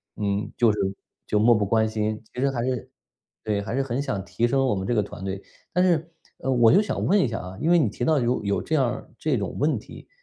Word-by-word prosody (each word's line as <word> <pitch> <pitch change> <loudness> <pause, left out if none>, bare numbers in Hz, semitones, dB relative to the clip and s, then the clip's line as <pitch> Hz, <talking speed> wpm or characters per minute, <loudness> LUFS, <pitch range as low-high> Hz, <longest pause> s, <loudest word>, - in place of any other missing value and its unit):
嗯， 100 0 -2
就 115 -2 +5
是 105 - -3 0.5
就 105 - +1
漠 115 +3 +6
不 105 - +2
关 110 +1 +3
心。 110 0 -2
其 125 - -4
实 140 - +3
还 120 -3 -2
是 125 -3 -3 0.5
对， 105 -2 -1
还 105 +4 -4
是 135 - +1
很 130 0 -2
想 100 -9 -3
提 95 +6 0
升 135 +1 +2
我 125 - +2
们 95 -1 -3
这 120 - +1
个 105 - +3
团 95 -2 -9
队。 95 0 -3 0.3
但 180 - +2
是， 170 -2 +1 0.3
呃， 135 - -1
我 120 -3 +5
就 195 - +6
想 210 - -2
问 205 +3 +4
一 - - +2
下 115 - -3
啊， 90 +1 -7
因 160 - +1
为 175 - +6
你 145 -10 +3
提 120 - -5
到 155 +2 +3
有 120 -2 0
有 100 0 0
这 - - -5
样 145 -4 +4
儿 125 +2 -4
这 - - +1
种 - - -4
问 - - +2
题， - - -11
120 Hz, 290 characters per minute, -25 LUFS, 105-135 Hz, 0.5 s, 漠